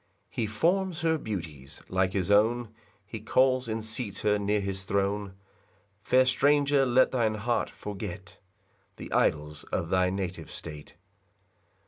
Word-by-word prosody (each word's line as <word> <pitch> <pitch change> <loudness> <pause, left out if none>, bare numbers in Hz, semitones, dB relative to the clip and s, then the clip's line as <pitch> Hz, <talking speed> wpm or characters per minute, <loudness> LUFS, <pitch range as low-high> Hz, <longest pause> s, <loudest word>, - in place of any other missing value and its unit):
3 - - -2
He 110 - 0
forms 175 - 0
her 160 -1 +2
beauties 80 - -7
like 95 0 0
his 95 0 0
own; 115 +3 +3 0.4
He 110 +2 -7
calls 130 +3 +2
and 110 0 -3
seats 110 -1 -3
her 105 -1 +2
near 105 +1 +1
his 95 -1 -3
throne: 100 0 -1 0.7
Fair 130 +4 +4
stranger, 140 +1 +3
let 125 +1 +4
thine 115 -4 +1
heart 115 +3 -1
forget 100 -2 -7 0.6
The - - -9
idols 75 0 0
of 85 - -3
thy 95 0 +3
native 90 -3 -4
state. 75 -2 -9
105 Hz, 140 wpm, -28 LUFS, 95-125 Hz, 0.7 s, Fair